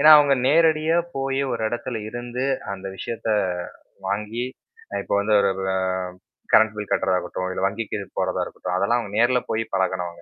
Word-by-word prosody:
ஏன்னா, 155 +2 +8
அவங்க 145 -2 +5
நேரடியா 160 +2 +4 0.2
போய் 135 0 0
ஒரு 115 -1 -2
இடத்துல 120 0 -3
இருந்து 120 +2 -4 0.3
அந்த 95 0 -8
விஷயத்த 115 +1 -5 0.8
வாங்கி 105 +4 -2 0.6
இப்போ - - -3
வந்து 105 +1 +1
ஒரு 100 -1 +3 0.2
அ - - +2 0.8
கரண்ட் 110 0 +6
பில் 105 -1 -6
கட்டு்றதாகட்டும், 95 0 0
இல்ல - - -3
வங்கிக்கு 105 +1 -3 0.2
போறதா 95 -1 0
இருக்கட்டும். 90 0 -4
அதெல்லாம் 115 +6 +2
அவங்க 100 -2 -8
நேர்ல 125 +1 +4
போய் 115 +1 +1
பழகனவங்க. 95 -2 -1
110 Hz, 155 wpm, -23 LUFS, 100-125 Hz, 0.8 s, ஏன்னா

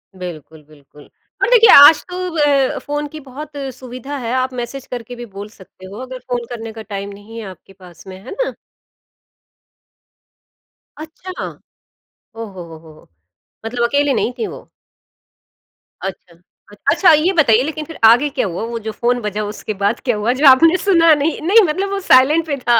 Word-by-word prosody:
बिल्कुल, 160 -4 -9
बिल्कुल। 145 -1 -19 0.3
पर - - +2
देखिए, 460 -2 +6
आज 290 +2 +8
तो 360 - -6 0.2
व 285 -3 +2
फ़ोन 295 0 -4
की 310 +2 -10
बहुत 285 +2 -10 0.2
सुविधा 255 +3 -8
है, 235 -2 -5
आप 255 0 -1
मैसेज 245 +2 -6
करके 245 0 -7
भी 240 0 -8
बोल 205 +1 -7
सकते 190 -2 -17
हो 200 +5 -10
अगर 255 0 -8
फ़ोन 245 -1 -4
करने 225 -2 -7
का 225 - -9
टाइम 200 0 -5
नहीं 210 +3 -11
है 220 - -7
आपके 185 +2 -15
पास 180 -1 -17
में। 185 0 -9
है - - -10
ना? - - -3 2.4
अच्छा! 325 +4 -8 0.9
ओ 230 - -5
हो 190 -4 -10
हो 160 - -11
हो! 155 -1 -18 0.6
मतलब 235 +1 -1
अकेले 285 +1 +1
नहीं 245 - -1
थीं 225 - -2
वो। - - -16 1.3
अच्छा। 180 -3 -8 0.5
अच्छा, 370 - +5
ये 310 +5 +3
बताइए 255 - +4
लेकिन 310 +1 -5
फिर 325 - -11
आगे 245 +6 +5
क्या 275 -4 -2
हुआ 175 +4 -5
वो 230 - -4
जो - - -2
फ़ोन 245 +2 -1
बजा 210 0 -3
उसके 215 - -6
बाद 205 +3 +1
क्या 245 - +1
हुआ? 215 +4 0
जो - - +4
आपने 325 +7 +6
सुना 335 -5 +4
नहीं। 295 +2 -1
नहीं 445 +4 +6
मतलब 390 +6 -3
वो 400 - -2
साइलेंट 295 +6 +5
पे 285 - -2
था। 235 -1 +5
245 Hz, 180 wpm, -17 LUFS, 210-295 Hz, 2.4 s, आज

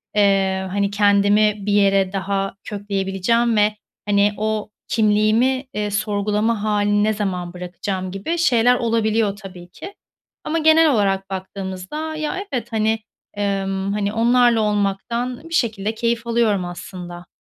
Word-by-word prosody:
eee, 195 -2 +2
hani, 200 0 0
kendimi 205 +1 +3
bir 205 - 0
yere 195 -1 +3
daha 195 0 -2
kökleyebileceğim 205 +3 0
ve, 210 0 +3 0.3
hani, 205 0 +2
o 215 0 -2 0.2
kimliğimi, 220 +5 +2
eee, 210 0 -2
sorgulama 210 +1 0
hâlini 205 -1 +1
ne 215 +1 +2
zaman 180 -4 -3
bırakacağım?" 185 +1 -5
gibi 200 - -3
şeyler 245 -6 +4
olabiliyor 225 -3 +1
tabii 185 -4 -11
ki 385 - -10 0.5
ama 330 +2 -1
genel 315 0 +5
olarak 195 -4 0
baktığımızda 190 +10 -5
ya 310 +4 -3
evet, 240 -3 -3
hani, 220 0 +1 0.3
emm, 195 -1 -2
hani, 205 0 -1
onlarla 235 0 +3
olmaktan 215 +7 -2
bir - - -8
şekilde 220 -6 0
keyif 235 0 -1
alıyorum 225 -5 +1
aslında. 175 0 -8
205 Hz, 130 wpm, -20 LUFS, 195-230 Hz, 0.5 s, genel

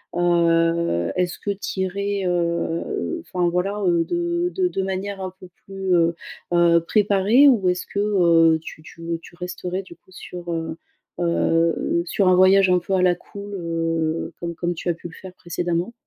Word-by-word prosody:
heu, 170 - +2
est-ce 180 -1 -1
que 205 - -2
tu 195 -1 -4
irais, 200 +1 -2
heu, 175 - -1
enfin, 175 -2 0
voilà, 195 +4 -1
heu, 170 -2 +3
de 345 0 -1
de 370 -1 +2
de 195 - -2
manière 195 +1 -4
un 185 -1 -4
peu 185 - -11 0.2
plus, 195 -2 -1
heu 170 0 +2 0.4
heu, 170 -1 +4
préparée 210 +6 +4
ou 205 -9 +4
est-ce 180 0 -1
que, 200 - -4
heu, 170 -6 +4
tu 155 - -10
tu, 165 - -14
heu, 165 0 -3
tu 170 - -15
resterais 180 +1 -4
du 170 -2 -14
coup 185 - -27
sur, 175 -1 -8
heu 165 -1 -3 0.4
heu, 170 0 +1
sur 190 +3 +1
un 185 - +5
voyage 190 +1 +5
un 180 0 +4
peu 190 +3 -4
à 185 - +3
la 180 -1 +4
cool, 200 +3 -10
heu, 165 -1 -2
comme 170 0 -4
comme 175 +1 -2
tu 175 - -4
as 170 - +2
pu 170 - -9
le 165 - -13
faire 185 +2 -11
précédemment? 175 +4 -3
180 Hz, 185 wpm, -22 LUFS, 170-195 Hz, 0.4 s, un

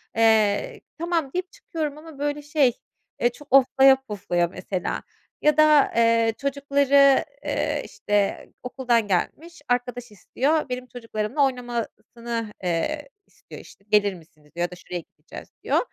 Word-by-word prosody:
Eee, 220 -2 +2 0.2
"Tamam." 335 -4 -1
deyip 365 +1 -3
çıkıyorum 305 -3 -5
ama 310 -2 -12
böyle 290 0 -2
şey, 290 -5 +2 0.5
eee, 240 - +3
çok 290 +4 -15
oflaya 270 0 +6
puflaya 195 -7 -1
mesela. 185 +1 -4 0.4
Ya 300 0 +3
da, 305 -2 +5
eee, 230 -1 +3
çocukları, 280 0 +3 0.2
eee, - - -1
işte, 205 -1 -1 0.2
okuldan 245 -3 0
gelmiş, 315 - -2
arkadaş 245 -1 -2
istiyor. 280 +8 -1
Benim 250 0 -4
çocuklarımla 230 +3 -1
oynamasını, 235 -2 -4
eee, 280 - -2 0.2
istiyor - - -13
işte. 195 - -18
"Gelir 205 -2 +3
misiniz?" 155 -3 -18
diyor 175 - -1
ya - - -26
da - - -8
"Şuraya 180 0 -6 0.2
gideceğiz." - - -11 0.2
diyor. - - +2
245 Hz, 135 wpm, -24 LUFS, 210-285 Hz, 0.5 s, oflaya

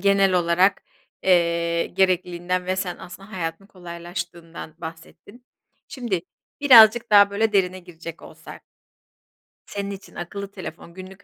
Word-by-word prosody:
genel 195 0 +3
olarak, 180 +2 +2 0.4
eee, 170 -2 +2
gerekliliğinden 180 -1 0
ve 185 +1 -1
sen 185 -2 -3
aslında 195 +4 -12
hayatın 170 +1 -5
kolaylaştığından 170 -3 -8
bahsettin. 165 +9 -11 0.4
Şimdi 230 -10 -3 0.4
birazcık 235 -4 +7
daha 205 -1 +7
böyle, 215 +2 0
derine 185 -2 +1
girecek 170 -2 -11
olsak - - -12 1.0
senin 200 0 -5
için 195 0 -11
akıllı 200 +3 -6
telefon 170 -3 -9
günlük 190 +2 -12
185 Hz, 120 wpm, -23 LUFS, 170-200 Hz, 1.0 s, birazcık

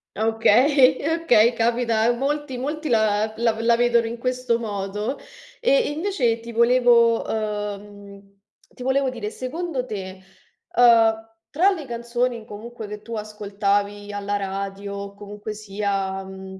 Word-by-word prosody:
Okay, 250 +5 +4 0.2
okay, 235 -6 +5
capita 230 -1 +1
a 230 +2 +4
molti. 275 +2 -2
Molti 300 +4 -4
la 215 -2 +2
la 230 -1 +1
la 230 0 +3
vedono 235 -1 +3
in 235 +1 -5
questo 255 -1 -1
modo. 210 +2 -3 0.4
E - - +3
invece 295 - 0
ti 235 +1 -8
volevo, 235 0 +4
ehm, 205 -2 -6 0.4
ti 250 - -9
volevo 265 +1 +1
dire, 230 -5 -5
secondo 265 +3 -4
te, 190 -4 -7 0.5
ehm, 225 -2 +5 0.2
tra 360 +7 +3
le 330 -7 -4
canzoni 240 -1 -2
comunque 220 +1 -9
che 210 0 -8
tu 230 +1 -7
ascoltavi 205 -1 -2
alla 205 0 -3
radio 195 0 -4
o 200 0 -7
comunque 205 +1 -8
sia 195 -2 -3
mhmm, 190 0 -10
225 Hz, 135 wpm, -23 LUFS, 205-245 Hz, 0.5 s, okay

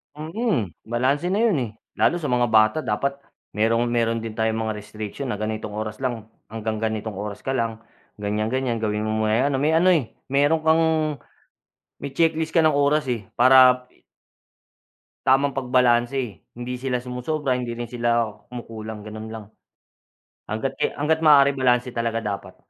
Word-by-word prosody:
Mhm, 155 - -2
balanse 130 +7 0
na 210 - +1
yun 220 -9 +3
eh 110 - -7 0.3
lalo 175 0 +2
sa 150 - -2
mga 125 -1 +2
bata 110 +3 +4
dapat 140 +6 -1 0.4
merong, 115 +2 +2
meron 115 -1 0
din 115 -1 -7
tayong 110 0 0
mga 110 -1 -2
restriction 105 +5 -7
na 105 - -2
ganitong 110 -1 -3
oras 110 0 -4
lang 120 -4 -4 0.2
hanggang 110 0 -3
ganitong 110 -2 -3
oras 105 0 -5
ka - - -5
lang 115 -4 -1 0.4
ganyan-ganyan 110 +4 -1
gawin 105 -1 -1
mo 110 0 -1
muna 110 - +1
yung 140 - +2
ano 135 - 0
may 150 +4 +2
ano 170 +3 +4
eh, 155 -10 +1 0.2
meron 145 +4 +3
kang 160 +1 +4 1.2
may 140 - -6
checklist 160 -1 +1
ka 165 - +5
ng 155 - +5
oras 145 +1 +2
eh 110 -5 -4
para 125 0 +6 1.4
tamang 135 +1 +3
pagbalanse 125 -3 +1
hindi 120 +1 -5
sila 125 0 -2
sumosobra, 125 +3 -2
hindi 125 -1 -3
rin 120 - -4
sila 120 -1 +1 0.2
kumukulang, 110 -3 -7
ganun 110 +1 -7
lang. 110 -2 -7 1.0
Hangga't 110 +5 -3
ki - - 0
hangga't 155 +2 +1
maaari 140 -2 +7
balanse 125 -1 +2
talaga 115 -1 -2
dapat 100 -2 -5
120 Hz, 160 wpm, -23 LUFS, 110-140 Hz, 1.4 s, maaari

